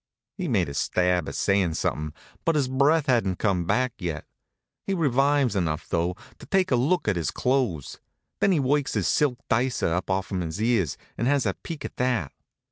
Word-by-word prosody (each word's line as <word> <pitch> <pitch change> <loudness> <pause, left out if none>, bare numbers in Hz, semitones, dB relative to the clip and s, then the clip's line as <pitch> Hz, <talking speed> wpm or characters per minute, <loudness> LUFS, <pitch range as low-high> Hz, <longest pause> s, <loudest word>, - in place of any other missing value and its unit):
He 185 -3 -3
makes 95 - +1
a - - -7
stab 90 +3 +1
at - - -7
sayin' 95 -5 +1
something, 75 -1 -2 0.3
but 165 - +2
his 140 -4 +2
breath 140 +4 +3
hadn't 115 -9 +1
come 95 -5 0
back 125 +6 +1
yet. 85 -6 -4 0.6
He 195 - +1
revives 140 - +2
enough 80 -5 -1
though, 85 +2 0 0.2
to - - -12
take 190 -3 +2
a - - +5
look 145 +6 +1
at 100 -4 +2
his 80 -4 -1
clothes. 125 - -1 0.4
Then 200 - +3
he 170 - +3
works 140 +1 +1
his - - +1
silk 140 -5 +2
dicer 120 -7 +1
up 90 +3 -2
off'm 95 0 -1
his 80 +2 -4
ears, 110 - +1 0.2
and 120 - +1
has 140 -2 +2
a 100 - +1
peek 160 - -8
at - - -7
that. 125 - 0
120 Hz, 195 wpm, -25 LUFS, 90-140 Hz, 0.6 s, a